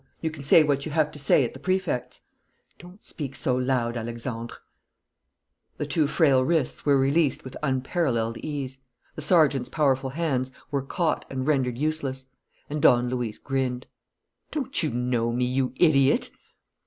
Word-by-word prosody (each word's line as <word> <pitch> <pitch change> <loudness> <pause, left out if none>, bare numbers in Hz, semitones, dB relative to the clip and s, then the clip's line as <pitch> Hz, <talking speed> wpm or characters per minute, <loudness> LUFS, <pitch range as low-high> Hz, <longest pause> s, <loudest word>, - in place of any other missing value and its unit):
You 160 - -2
can 155 -3 -9
say 140 +3 +6
what 140 -2 0
you - - -5
have 155 -1 +2
to 150 - -10
say 135 -1 +3
at - - -5
the 135 - -10
Prefect's." 185 -6 -2 0.6
"Don't 180 +5 -14
speak 140 -4 -6
so 125 0 +1
loud, 125 -2 0
Alexandre." 115 0 -5 1.2
The - - -2
two 155 -3 +1
frail 140 -5 +3
wrists 155 -2 -1
were 140 -1 +5
released 140 +2 +2
with 130 0 -9
unparalleled 130 -4 -1
ease; 135 -3 -5 0.3
the - - -7
sergeant's 150 -5 +3
powerful 135 -3 +1
hands 135 -4 -1 0.2
were 140 -1 0
caught 160 +4 -1
and 130 -1 -3
rendered 130 -5 +1
useless; 140 -3 -2 0.4
and 150 0 -4
Don 125 -1 +5
Luis 120 -4 -3
grinned: 130 -2 -2 0.6
"Don't 275 -3 -1
you 155 - 0
know 120 -1 0
me, 125 +1 0
you 130 +1 0
idiot?" 140 -4 +3
135 Hz, 155 wpm, -25 LUFS, 125-155 Hz, 1.2 s, say